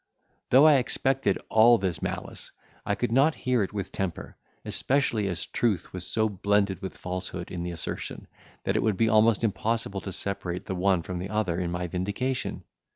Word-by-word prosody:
Though 135 +4 +7
I 150 -2 +7
expected 130 -3 +1
all 115 +2 +6
this 95 -5 -2
malice, - - -5 0.4
I - - +1
could - - -1
not 140 +6 +4
hear 125 -3 +1
it 95 - -1
with 100 -3 -4
temper, 95 -4 -4 0.3
especially 125 -7 0
as 90 -3 -3
truth 105 -8 -1
was 90 -1 -4
so 110 0 +1
blended 100 -1 +1
with 95 - -6
falsehood 90 -1 -5
in 90 - -4
the 90 - -3
assertion, 85 -2 -5 0.4
that - - 0
it - - +2
would 110 -4 +1
be 115 -1 +3
almost 110 0 +4
impossible 110 -1 -1
to 95 - -6
separate 95 -2 -4
the - - -3
one 95 -1 +2
from 90 +1 -5
the 95 +2 -5
other 105 -5 0
in 90 -2 -1
my 85 +1 -2
vindication. 100 +9 -2
100 Hz, 185 wpm, -27 LUFS, 90-115 Hz, 0.4 s, Though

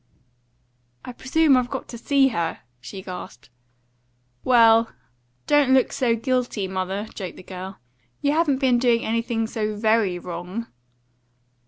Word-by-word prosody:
"I - - -6
presume 280 +4 +3
I've 250 -1 +1
got 270 - -5
to 235 - -7
see 275 +2 +3
her," 170 -8 -3 0.2
she 190 +10 -9
gasped. 180 -9 -9 0.9
"Well, 230 -2 +5 0.6
don't 290 -3 +4
look 260 - +2
so 235 -3 +1
guilty, 240 -4 -1
mother," 190 +2 -3
joked 185 -4 -7
the - - -11
girl; 190 +1 -8 0.4
"you 285 - +1
haven't 305 -3 +2
been 260 -3 +2
doing 235 -2 +2
anything 230 0 -1
so 215 -1 -3
VERY 215 -3 +2
wrong." 180 +5 -6
230 Hz, 135 wpm, -23 LUFS, 190-255 Hz, 0.9 s, Well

